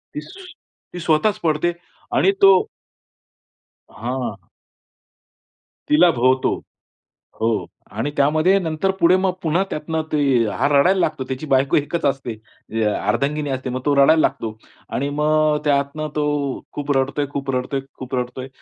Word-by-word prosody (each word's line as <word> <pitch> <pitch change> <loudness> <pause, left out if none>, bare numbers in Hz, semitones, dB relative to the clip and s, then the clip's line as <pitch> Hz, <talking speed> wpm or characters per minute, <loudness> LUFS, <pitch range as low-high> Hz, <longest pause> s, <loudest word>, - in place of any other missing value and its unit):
ती 365 - -11
स्वतःच 175 +6 +1
पडते 160 +1 +1 0.4
आणि 195 - +4
तो 195 -1 +8 1.4
हां. 125 +2 -4 1.5
तिला 170 +4 +6
भोवतो. 130 0 +1 0.8
हो, 110 -5 +1 0.3
आणि 115 +7 -3
त्यामध्ये 155 +7 +3
नंतर 165 +2 -1
पुढे 170 +2 +5
मग 190 0 +1
पुन्हा 170 +4 +2
त्यातनं 160 +1 -2
ते 155 - +1 0.3
हा 105 - 0
रडायला 175 +7 +4
लागतो. 155 -6 0
त्याची 130 +4 -4
बायको 135 +1 +3
एकच 150 +2 -1
असते. 135 -3 -1 0.6
अर्धांगिनी 145 +1 -1
असते. 130 -1 -3
मग 130 +1 -3
तो 145 - +3
रडायला 150 +3 +5
लागतो. 110 -6 -1 0.3
आणि 140 +2 -2
मग 155 0 +3
त्यातनं 145 +1 0
तो 150 - +1 0.5
खूप 145 0 -3
रडतोय, 140 +2 0
खूप 140 -1 -4
रडतोय, 130 +2 -2 0.2
खूप 130 0 -5
रडतोय. 125 +1 -4
145 Hz, 130 wpm, -21 LUFS, 130-160 Hz, 1.5 s, तो